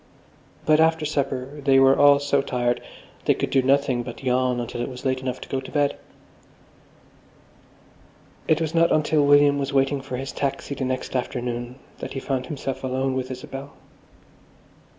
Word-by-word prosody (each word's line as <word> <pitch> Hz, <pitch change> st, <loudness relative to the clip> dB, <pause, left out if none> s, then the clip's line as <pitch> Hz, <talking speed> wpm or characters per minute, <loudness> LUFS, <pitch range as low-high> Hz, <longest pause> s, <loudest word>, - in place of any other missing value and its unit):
But 155 Hz, 0 st, +4 dB
after 160 Hz, -1 st, +3 dB
supper 140 Hz, -1 st, -3 dB
they 135 Hz, -1 st, +4 dB
were 135 Hz, 0 st, +6 dB
all 145 Hz, 0 st, +6 dB
so 140 Hz, -1 st, +1 dB
tired 120 Hz, -2 st, -1 dB, 0.4 s
they -, -, +4 dB
could -, -, -3 dB
do 135 Hz, -, +4 dB
nothing 135 Hz, -1 st, +2 dB
but 120 Hz, +2 st, -8 dB
yawn 125 Hz, -1 st, +1 dB
until 120 Hz, 0 st, -4 dB
it 120 Hz, -, -3 dB
was 125 Hz, 0 st, -10 dB
late 130 Hz, -1 st, +1 dB
enough 130 Hz, -1 st, -4 dB
to -, -, -8 dB
go 135 Hz, -, -2 dB
to -, -, -10 dB
bed.... 145 Hz, -1 st, +1 dB, 2.5 s
It 155 Hz, -, +3 dB
was 160 Hz, -1 st, -2 dB
not 165 Hz, 0 st, +3 dB
until 155 Hz, -1 st, +3 dB
William 145 Hz, 0 st, +5 dB
was 140 Hz, 0 st, -3 dB
waiting 135 Hz, 0 st, +2 dB
for 135 Hz, -2 st, -5 dB
his 135 Hz, +1 st, -5 dB
taxi 140 Hz, 0 st, -3 dB
the 130 Hz, -1 st, -3 dB
next 130 Hz, +1 st, -3 dB
afternoon 120 Hz, -1 st, -3 dB, 0.2 s
that -, -, -6 dB
he 135 Hz, -, -3 dB
found 130 Hz, -1 st, -3 dB
himself 135 Hz, -3 st, -5 dB
alone 130 Hz, +1 st, -1 dB
with 130 Hz, -1 st, -3 dB
Isabel. 135 Hz, +2 st, -8 dB
135 Hz, 170 wpm, -24 LUFS, 130-145 Hz, 2.5 s, were